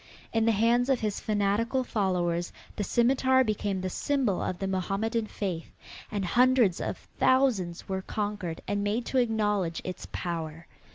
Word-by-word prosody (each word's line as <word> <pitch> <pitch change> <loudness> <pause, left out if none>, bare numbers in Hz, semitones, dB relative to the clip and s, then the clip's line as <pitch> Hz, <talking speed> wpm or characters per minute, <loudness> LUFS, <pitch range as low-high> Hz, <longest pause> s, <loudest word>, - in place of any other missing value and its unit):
In 225 -1 +2
the - - +6
hands 235 +4 +3
of 265 -3 +2
his 210 -2 -1
fanatical 215 +5 +1
followers 180 -6 0 0.2
the 210 - -2
scimitar 260 +4 +3
became 205 -4 -1
the 185 - -2
symbol 265 -8 0
of 180 - -2
the 195 - -3
Mohammedan 200 +4 -1
faith 185 -7 -4 0.4
and 205 -3 -1
hundreds 240 -2 +4
of - - -2 0.2
thousands 235 -10 +2
were 190 0 -2
conquered 205 -5 -3
and 205 0 0
made 215 +4 0
to 265 - +1
acknowledge 210 -7 +1
its 185 - -6
power. 165 -2 -4
205 Hz, 155 wpm, -28 LUFS, 185-235 Hz, 0.4 s, the